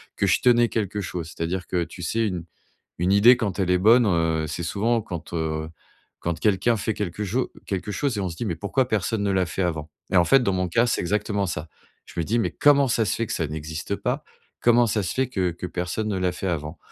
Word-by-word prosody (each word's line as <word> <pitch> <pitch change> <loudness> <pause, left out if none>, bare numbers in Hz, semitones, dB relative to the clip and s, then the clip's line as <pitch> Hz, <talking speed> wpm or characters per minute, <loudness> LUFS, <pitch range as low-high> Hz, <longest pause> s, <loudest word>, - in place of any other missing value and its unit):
que 100 - +1
je 95 - +3
tenais 120 -1 +4
quelque 105 -2 -2
chose. 85 -3 -5
C'est-à-dire 90 +2 -2
que, 90 -2 -1
tu 90 +1 -9
sais, 110 +6 0
une 90 -4 -4 0.5
une 90 +3 +2
idée 115 +5 +7
quand 105 -5 -3
elle 95 -2 +1
est 90 - +4
bonne, 115 +4 +5
heu, 80 -3 +1
c'est 75 +3 -4
souvent 110 +6 0
quand, 85 -3 -7
heu, 80 -1 -2 0.5
quand 85 -1 -3
quelqu'un 105 +2 +2
fait 110 +3 -1
quelque 105 +1 -3
cho 120 +7 -1
quelque 100 +1 -3
chose 135 0 -1
et - - -1
on 95 - -2
se 80 - -8
dit: 115 - -3
«Mais 85 -4 -2
pourquoi 120 +8 0
personne 110 -1 0
ne 100 - +1
l'a 95 -1 +2
fait 95 - -3
avant?» 80 -3 -2 0.2
et - - +3
en 90 - +6
fait, 135 +9 +5
dans 100 -5 +1
mon 90 -1 0
cas, 115 +7 +3
c'est 120 - 0
exactement 100 +2 0
ça. 80 -1 -4 0.4
Je - - -11
me 85 - +1
dis: 115 +8 0
«Mais 115 - +1
comment 140 -2 +4
ça 115 -1 +2
se 100 - 0
fait 115 - -2
que - - -5
ça 80 - -1
n'existe 80 +1 -4
pas? - - -2 0.4
Comment 120 0 +5
ça 105 -1 0
se 90 - -2
fait 130 -1 +1
que 95 -8 0
que 85 +2 -6
personne 90 +5 -3
ne 100 -3 -1
l'a 90 -1 0
fait 95 +2 -5
avant?» 80 -1 -3
95 Hz, 250 wpm, -24 LUFS, 85-110 Hz, 0.5 s, idée